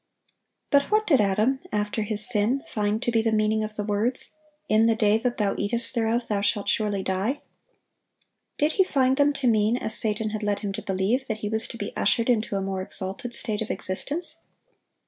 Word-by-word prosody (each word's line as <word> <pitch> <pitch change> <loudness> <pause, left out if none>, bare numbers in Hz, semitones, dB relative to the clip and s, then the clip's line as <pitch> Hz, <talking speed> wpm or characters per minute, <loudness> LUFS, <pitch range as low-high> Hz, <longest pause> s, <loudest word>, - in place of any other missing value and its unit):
But 280 0 +3
what 430 0 +2
did 275 - +4
Adam, 215 +7 +1
after 210 +1 -1
his 215 +1 +1
sin, 245 +4 +3
find 210 0 -1
to 240 - 0
be 225 -1 +2
the 225 0 0
meaning 215 0 +1
of 215 0 -5
the 210 - -3
words, 215 +5 +1 0.3
"In 220 +1 +4
the 225 - +3
day 215 0 +3
that 245 +1 -2
thou 205 -2 +1
eatest 230 +3 +2
thereof 230 0 0
thou 205 -2 -1
shalt 205 0 0
surely 205 -3 0
die"? 195 +10 -2 1.1
Did 300 +2 +2
he 380 - +3
find 265 -7 +2
them 290 0 +4
to 275 -2 -1
mean, 220 +1 +3
as 220 - -4
Satan 215 0 -1
had 215 0 -4
led 205 -1 -1
him 200 -2 -3
to - - -5
believe, 200 +8 -1
that 220 -2 -4
he 210 - -2
was 220 +1 -1
to 230 - -8
be 205 - -6
ushered 230 +4 +2
into 215 -3 -1
a 195 - -1
more 190 -1 -3
exalted 195 +6 -4
state 215 -2 -2
of 220 - -4
existence? 290 - -2
220 Hz, 205 wpm, -25 LUFS, 205-245 Hz, 1.1 s, did